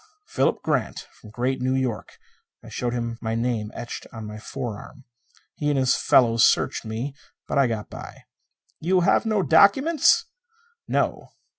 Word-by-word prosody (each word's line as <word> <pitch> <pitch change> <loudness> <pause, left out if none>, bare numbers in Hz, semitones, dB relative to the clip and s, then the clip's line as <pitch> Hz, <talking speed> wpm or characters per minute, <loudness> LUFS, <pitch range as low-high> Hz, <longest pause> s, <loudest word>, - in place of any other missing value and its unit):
"Philip 440 - 0
Grant. - - -2
From 110 - -15
Great 125 +4 -2
New 130 +1 +1
York." 130 -5 -3 0.5
I - - -11
showed 120 -1 -3
him 115 -1 -3
my 110 0 -2
name 115 -2 -1
etched 120 - -7
on 110 -2 -8
my 105 0 -8
forearm. 125 +2 -7 0.5
He 150 - -2
and 145 - +1
his 130 -1 +3
fellows 115 -3 +4
searched - - +2
me, 115 +6 -4 0.3
but - - 0
I 135 - +4
got 110 -3 -4
by. - - -10 0.6
"You 180 +3 +2
have 175 - +2
no 215 -3 +1
documents?" 260 - +4 0.6
"No." - - -1
125 Hz, 155 wpm, -24 LUFS, 115-145 Hz, 0.6 s, fellows